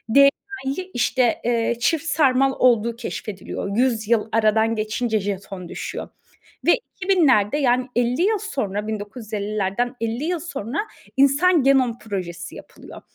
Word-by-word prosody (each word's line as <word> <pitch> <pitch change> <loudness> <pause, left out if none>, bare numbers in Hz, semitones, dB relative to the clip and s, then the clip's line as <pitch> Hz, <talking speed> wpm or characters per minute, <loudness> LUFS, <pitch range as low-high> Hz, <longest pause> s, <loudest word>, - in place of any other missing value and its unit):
DNA'yı, 280 +4 +2
işte, 245 0 +1
eee, 235 0 +1
çift 320 +6 +1
sarmal 270 -4 +3
olduğu 235 -2 +3
keşfediliyor. 210 -3 -5
100 235 -4 +1
yıl 225 -1 +1
aradan 220 0 +2
geçince 220 +1 -1
jeton 195 -2 -5
düşüyor. - - -6 0.6
Ve - - +8 0.3
2000'lerde, 295 - +3
yani, 255 -3 +2
50 245 +4 +1
yıl 430 +2 +2
sonra, 215 - -3
1950'lerden 215 +1 -3
50 230 +4 -2
yıl 345 +2 -1
sonra 300 -6 -5 0.4
insan 285 +4 +4
genom 260 -3 +3
projesi 180 -5 -6
yapılıyor. - - -12
240 Hz, 125 wpm, -22 LUFS, 215-275 Hz, 0.6 s, Ve